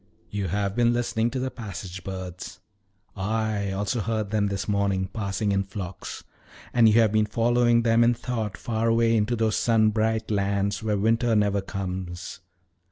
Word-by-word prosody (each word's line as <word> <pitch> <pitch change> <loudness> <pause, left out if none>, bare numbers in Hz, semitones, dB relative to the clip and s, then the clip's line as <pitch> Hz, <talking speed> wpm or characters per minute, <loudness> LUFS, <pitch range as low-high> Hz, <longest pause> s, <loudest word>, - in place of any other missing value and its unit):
You 100 -2 -2
have 100 +2 -1
been 120 0 +3
listening 120 -1 0
to 130 - -4
the 130 0 -2
passage 95 -5 -7
birds. 95 -1 -7 0.6
I 105 0 -1
also 100 +4 -1
heard 110 -1 -2
them 105 -2 +1
this 100 -1 -3
morning 100 -2 +1
passing 100 +1 -2
in 100 0 +2
flocks. 95 -2 -7 0.5
And 115 -2 +6
you 110 +2 +5
have 110 -3 +4
been 110 0 +2
following 120 +1 +3
them 115 0 +4
in 120 +1 +4
thought 110 -6 -3
far 115 +2 -1
away 115 0 +3
into 110 +2 +1
those 110 -1 +1
sun 110 -2 +3
bright 110 0 0
lands 100 0 0
where 105 -2 0
winter 115 +3 +2
never 100 -1 +2
comes." 95 -2 -5
105 Hz, 165 wpm, -25 LUFS, 100-115 Hz, 0.6 s, And